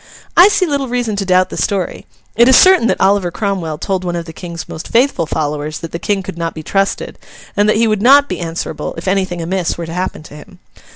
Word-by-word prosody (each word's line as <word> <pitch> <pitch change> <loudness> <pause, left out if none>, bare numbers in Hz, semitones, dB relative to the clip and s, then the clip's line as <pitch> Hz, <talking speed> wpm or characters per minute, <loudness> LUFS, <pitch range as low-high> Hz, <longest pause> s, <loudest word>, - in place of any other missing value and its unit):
I 355 - +8
see 405 -2 +2
little 285 -4 -1
reason 240 -3 -2
to 195 - -2
doubt 185 0 +3
the - - -6
story. 195 -3 -2 0.3
It 235 +3 +5
is 260 - +7
certain 370 -9 +6
that - - 0
Oliver 195 -2 +2
Cromwell 180 -5 -3
told 190 +3 -2
one 175 -1 -3
of 170 -1 -4
the 165 - -10
King's 170 -1 -8
most 160 - -8
faithful 235 - +1
followers 150 0 -3
that 165 - -8
the 170 - -5
King 195 +2 -1
could 185 -2 -8
not 165 0 -3
be 160 - -7
trusted, 195 +4 -2 0.4
and 205 0 +2
that 215 - +3
he 230 - +3
would 215 -2 0
not 280 +4 +6
be - - -4
answerable 165 -1 -5
if - - -7
anything 185 -3 -1
amiss 180 0 -2
were 170 - -5
to 165 - -7
happen 180 -3 -4
to 155 - -14
him. 180 +5 -14
190 Hz, 240 wpm, -16 LUFS, 170-215 Hz, 0.4 s, I